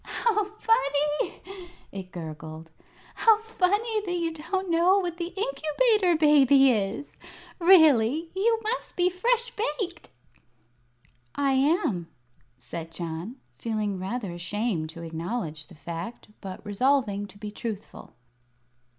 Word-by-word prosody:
"How 425 -3 0
funny!" 300 - 0 0.5
it 190 -2 -8
gurgled; 160 -1 -8 0.4
"how 445 -2 +5
funny 440 +1 0
that 355 -3 -2
you 335 -2 -1
don't 375 +5 -3
know 345 +4 +4
what 350 -3 -2
the 340 -1 -3
Incubator 390 -1 +1
Baby 280 -3 +6
is! 210 +5 -2 0.4
Really, 320 -4 +5
you 450 +4 +2
must 450 +4 -3
be 360 0 +2
fresh 475 +6 +1
baked!" 420 -7 -3 1.3
"I 280 -1 +1
am," 265 - +1 0.5
said 160 +7 -7
John, 170 +7 -5 0.2
feeling 215 -4 -2
rather 195 +1 -3
ashamed 175 -1 -2
to 170 +1 -8
acknowledge 165 -1 -4
the 180 - -15
fact, 170 +10 -7
but 190 +1 -8
resolving 205 -2 +1
to 200 - -15
be 210 0 -6
truthful. 215 -1 -7
275 Hz, 115 wpm, -27 LUFS, -, 1.3 s, Baby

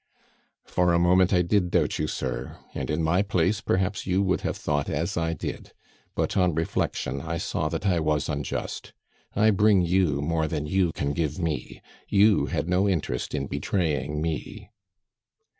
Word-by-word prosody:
"For 90 -1 +2
a 85 - +4
moment 90 +1 +4
I 90 -2 +4
did 90 0 +1
doubt - - +1
you, 75 - 0
sir, 65 -2 -4 0.2
and 65 - -4
in 75 +2 0
my 85 +4 +3
place 100 +1 +1
perhaps 95 +1 -1
you 95 +1 +2
would 95 -2 +1
have - - -2
thought 75 -1 -1
as 80 +4 -1
I 80 -1 0
did, - - -6 0.4
but - - -1
on 90 -4 +2
reflection 70 -4 -1
I 85 +3 -3
saw 85 -2 -2
that 85 +4 -4
I 90 -4 +3
was 75 -2 0
unjust. 70 -3 -4 0.4
I 110 +2 +4
bring 100 -1 +4
you 85 -5 +2
more 80 +2 0
than 75 -1 -3
you 90 +2 +1
can 70 0 -2
give 75 0 -1
me; 80 -7 -3 0.3
you 105 +1 +4
had - - -2
no 90 +3 +2
interest 75 -8 -2
in 70 -2 -1
betraying 75 -1 -1
me." 80 -3 -5
85 Hz, 175 wpm, -26 LUFS, 75-95 Hz, 0.4 s, a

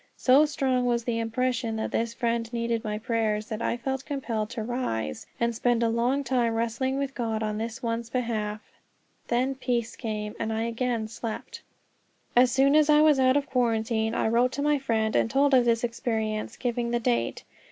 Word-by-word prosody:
So 270 +4 +5
strong 260 -4 0
was 235 -1 +1
the 230 -1 -1
impression 230 0 -1
that 220 - -3
this 230 0 0
friend 230 -1 -1
needed 235 -1 -1
my 210 -1 -2
prayers, 220 -2 -1
that 215 0 -4
I 235 - 0
felt 265 +2 -3
compelled 235 -7 -3
to 225 - -4
rise 215 - -3
and 235 0 +1
spend 235 +1 +1
a 230 - +2
long 245 +5 +1
time 240 -3 +1
wrestling 235 +4 -1
with 275 -1 -2
God 225 -4 -2
on 215 0 -2
this 230 +4 -5
one's 230 0 -2
behalf; 220 -4 -2 0.7
then 255 +3 +1
peace 245 -3 -2
came, 210 -2 -4
and 225 - -2
I 220 0 -1
again 235 -1 -1
slept. 225 0 -6 0.7
As 250 +1 +6
soon 275 +3 +4
as 305 -1 +5
I 300 0 +6
was 305 -3 +5
out 260 +1 +4
of 285 - 0
quarantine 225 -3 0
I - - +1
wrote 240 +3 +2
to 285 - -2
my 295 -1 +2
friend 220 -4 0
and - - +2
told 280 +3 +3
of 250 -2 +5
this 230 0 +2
experience, 220 -2 -2
giving 240 -1 -1
the 240 0 +1
date. 120 - -1
235 Hz, 195 wpm, -27 LUFS, 225-255 Hz, 0.7 s, As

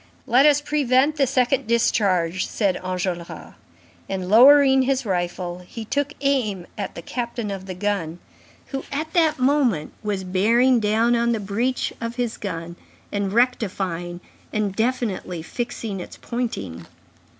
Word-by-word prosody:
"Let 260 +5 +5
us 290 -1 +4
prevent 290 0 +2
the 275 -2 +3
second 255 0 +1
discharge," 190 -6 +1
said 200 -4 0
Enjolras. 180 -2 -4 0.6
And, 185 -1 -3
lowering 265 +3 +7
his 265 0 0
rifle, 175 -2 -2
he 225 +2 -7
took 285 +5 -1
aim 235 -10 0
at 200 -3 -5
the 170 - -8
captain 235 -2 -4
of 190 -1 -6
the 185 - -5
gun, 180 -4 -2 0.5
who, 270 -1 -4
at 310 +3 -3
that 325 -3 +3
moment, 255 - +1
was 205 -3 -2
bearing 230 +7 +3
down 225 +3 +2
on 235 0 +2
the 225 - -1
breach 225 +6 -1
of 230 0 -4
his 240 -2 -2
gun 170 -3 -5 0.3
and 200 -1 -1
rectifying 190 -7 -1 0.3
and 210 -3 -1
definitely 220 -8 -2
fixing 225 -1 -4
its 180 - -9
pointing. 100 - -4
220 Hz, 140 wpm, -23 LUFS, 185-255 Hz, 0.6 s, lowering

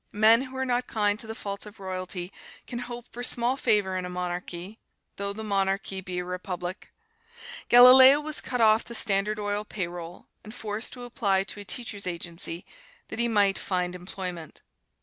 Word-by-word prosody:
Men 220 +3 +5
who 260 0 -7
are 265 - -1
not 245 -1 -1
kind 210 -1 0
to 225 - -3
the 225 - -6
faults 200 0 -5
of 210 0 -14
royalty 185 -1 -4 0.3
can 240 - -6
hope 240 -1 -7
for 245 - -7
small 245 +1 +2
favor 210 -7 +1
in 185 - -2
a 180 - -5
monarchy, 180 +2 -5 0.4
though 200 0 -3
the 220 +2 -7
monarchy 195 -1 -1
be 185 -1 -6
a 180 - -3
republic. 180 +1 -6 0.8
Galileo 260 +3 +9
was 300 0 -2
cut 250 -2 -2
off 220 0 +5
the 235 - -6
Standard 210 -1 +4
Oil 205 0 -2
payroll, 175 -4 -6 0.2
and 215 +2 -11
forced 215 0 -2
to 245 - -9
apply 200 -5 0
to 205 - -7
a - - -6
teachers' 205 -3 -3
agency, 170 0 -3 0.4
that 220 - -6
he 235 - +2
might 205 -3 +2
find 180 -1 -2
employment. 180 -2 -7
205 Hz, 180 wpm, -26 LUFS, 185-235 Hz, 0.8 s, Galileo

